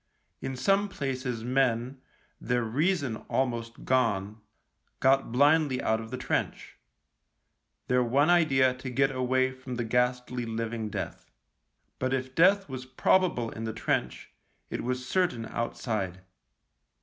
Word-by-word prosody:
In 135 - -4
some 195 +10 +2
places 130 -8 -3
men, 130 0 0 0.4
their 125 0 0
reason 140 +1 0
almost 115 -3 -2
gone, 110 -4 +1 0.6
got 135 -1 +3
blindly 145 +1 +3
out 110 0 0
of 110 - -9
the 130 - -4
trench 130 - -3 0.5
— - - -51
their 125 0 +3
one 135 +5 +3
idea 140 -7 +4
to 130 +1 -7
get 135 +2 +2
away 130 0 +1
from 130 -1 -7
the 120 - -2
ghastly 125 +1 0
living 115 -1 -3
death. - - -6 0.7
But 130 +1 0
if 130 0 -4
death 195 +6 +4
was 130 -2 -7
probable 130 -2 +2
in 115 - -6
the 110 - -3
trench, 110 - -2 0.4
it - - -3
was 125 +1 -3
certain 165 -10 0
outside. 110 -5 -3
130 Hz, 135 wpm, -28 LUFS, 115-135 Hz, 0.7 s, idea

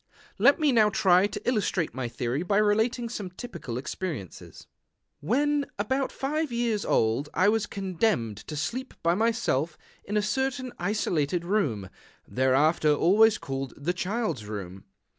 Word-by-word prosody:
Let - - +5
me 300 -3 +3
now 220 -4 +5
try 195 -2 +4
to - - -8
illustrate 205 -8 0
my 130 -2 -3
theory 125 +4 -2
by 200 +3 +1
relating 220 +3 +2
some 210 -5 -5
typical 180 - -7
experiences. 135 - -6 0.6
II - - -9
When 290 +5 +2
about 260 +6 -1
five 300 +1 -2
years 235 -3 0
old 115 +7 +1
I 185 +5 +4
was 220 -1 +1
condemned 185 - -1
to 155 - -5
sleep 245 - -4
by 170 +1 +3
myself 205 - 0 0.3
in 210 +2 -2
a 210 - +2
certain 255 +3 -1
isolated 175 -4 0
room, 150 - 0 0.4
thereafter 145 +5 +3
always 210 +8 +4
called 135 - -5
the 160 +5 -1
Child's 185 - -2
Room. 95 -3 -7
195 Hz, 145 wpm, -27 LUFS, 145-225 Hz, 0.6 s, Let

